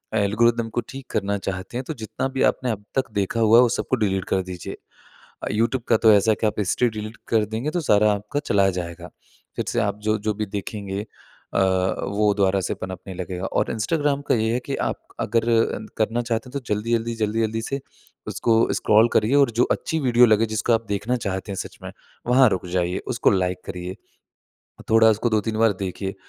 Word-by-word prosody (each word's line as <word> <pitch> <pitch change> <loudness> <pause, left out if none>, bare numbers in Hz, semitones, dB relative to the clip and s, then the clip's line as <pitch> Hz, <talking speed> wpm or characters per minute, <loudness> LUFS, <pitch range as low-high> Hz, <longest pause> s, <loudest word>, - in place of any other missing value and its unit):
Algorithm 115 +2 +2
को 120 +2 -2
ठीक 135 -1 -8
करना 100 -1 0
चाहते 95 +4 -5
हैं, 130 - -3
तो 160 - -3
जितना 110 +4 -3
भी 135 0 -3
आपने 125 -2 +1
अब 105 -1 -5
तक 130 -4 0
देखा 100 +2 -1
हुआ 115 +1 +6
है, - - +9
वो 120 - +3
सबको 130 - 0
डिलीट 95 -4 0
कर 95 - +2
दीजिए। 90 -1 -7 0.7
अ, - - -2
यूट्यूब 115 +4 0
का 115 - +5
तो 110 -1 +5
ऐसा 105 +2 +4
है - - +2
कि 110 - +3
आप - - -2
हिस्ट्री 110 +5 +1
डिलीट 110 0 -7
कर 110 -2 +3
देंगे, 110 +8 -3
तो 175 - -1
सारा 105 -5 +4
आपका 105 +7 -3
चला 100 -1 +3
जाएगा। 85 -1 -7 0.5
फिर - - -1
से - - 0
आप 105 - -1
जो-जो 110 0 0
भी 105 0 -2
देखेंगे 100 0 -5 0.5
अ, - - +2 0.5
वो 105 0 +2
दोबारा 100 -1 +2
से - - -2
पनपने 95 +1 -7
लगेगा 90 +1 -5
और - - 0
इंस्टाग्राम 145 +5 0
का - - +3
ये 110 0 +1
है 125 - +1
कि 140 - -2
आप - - -3 0.2
अगर 115 +2 +1 0.6
करना 115 +2 +1
चाहते 115 +1 -3
हैं, - - -14
तो 140 - -2
जल्दी-जल्दी, 115 +2 -1
जल्दी-जल्दी 110 0 -1
से 135 +4 -3 0.5
उसको 115 - 0 0.2
स्क्रॉल 110 +2 +4
करिए 110 +5 +2
और 140 -4 +4
जो - - +7
अच्छी 160 - -1
वीडियो 125 -3 +5
लगे, 110 +1 +4
जिसको 110 +2 0
आप 115 0 +1
देखना 105 +5 -1
चाहते 95 +1 -3
हैं 95 - -4
सच - - -10
में, - - -6 0.4
वहाँ 125 +1 +6
रुक 95 - -2
जाइए। 90 0 0
उसको 120 -4 +2
लाइक 90 -1 0
करिए। 90 +1 -6 1.0
थोड़ा 110 0 +6
उसको 110 +2 0
2-3 110 0 0
बार 115 -2 +4
देखिए, 95 +1 -4
110 Hz, 205 wpm, -23 LUFS, 100-115 Hz, 1.0 s, है